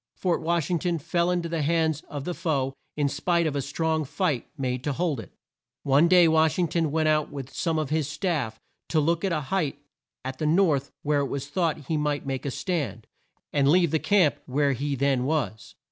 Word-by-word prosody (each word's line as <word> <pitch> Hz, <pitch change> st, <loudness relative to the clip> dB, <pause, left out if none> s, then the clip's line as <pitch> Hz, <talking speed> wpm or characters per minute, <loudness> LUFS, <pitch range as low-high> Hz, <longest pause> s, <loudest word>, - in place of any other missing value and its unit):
Fort 180 Hz, -3 st, 0 dB
Wash 170 Hz, -1 st, 0 dB
ing 175 Hz, -, +2 dB
ton 175 Hz, 0 st, 0 dB
fell 170 Hz, +3 st, 0 dB
in 180 Hz, -1 st, 0 dB
to -, -, -3 dB
the 165 Hz, -1 st, -1 dB
hands 160 Hz, 0 st, +1 dB
of 145 Hz, -2 st, -5 dB
the 180 Hz, -, -2 dB
foe 145 Hz, -7 st, -1 dB, 0.2 s
in 145 Hz, -1 st, +2 dB
spite 170 Hz, +4 st, +1 dB
of 150 Hz, -2 st, -1 dB
a 140 Hz, -, 0 dB
strong 160 Hz, +3 st, -1 dB
fight 150 Hz, -, -1 dB
made 130 Hz, -2 st, -2 dB
to 145 Hz, -, -1 dB
hold 155 Hz, -3 st, -1 dB
it. 105 Hz, -, -9 dB, 0.5 s
One 140 Hz, +4 st, +4 dB
day 175 Hz, -1 st, +6 dB
Wash 160 Hz, -1 st, +3 dB
ing 180 Hz, -2 st, +2 dB
ton 165 Hz, -2 st, +1 dB
went 155 Hz, +1 st, +1 dB
out 155 Hz, -1 st, +2 dB
with 140 Hz, -2 st, -7 dB
some 165 Hz, -2 st, -1 dB
of 155 Hz, -2 st, -2 dB
his 155 Hz, -3 st, +1 dB
staff 150 Hz, -, -2 dB, 0.3 s
to 160 Hz, -, +2 dB
look 165 Hz, +4 st, +1 dB
at 195 Hz, -, +1 dB
a 155 Hz, -2 st, 0 dB
height 150 Hz, -1 st, -1 dB, 0.5 s
at 130 Hz, 0 st, -5 dB
the 155 Hz, -, 0 dB
north 155 Hz, -5 st, +3 dB
where 150 Hz, 0 st, +2 dB
it 140 Hz, -, 0 dB
was 140 Hz, +1 st, -4 dB
thought 155 Hz, -2 st, -1 dB
he 160 Hz, -, 0 dB
might 150 Hz, -1 st, -1 dB
make 135 Hz, 0 st, -3 dB
a -, -, 0 dB
stand, 150 Hz, -, -3 dB, 0.5 s
and 140 Hz, -2 st, +3 dB
leave 170 Hz, +1 st, +4 dB
the 160 Hz, -, +2 dB
camp 180 Hz, -7 st, +3 dB
where 140 Hz, +2 st, +2 dB
he 140 Hz, +2 st, -2 dB
then 135 Hz, -1 st, +1 dB
was. 135 Hz, -7 st, -2 dB
155 Hz, 220 wpm, -26 LUFS, 140-170 Hz, 0.5 s, day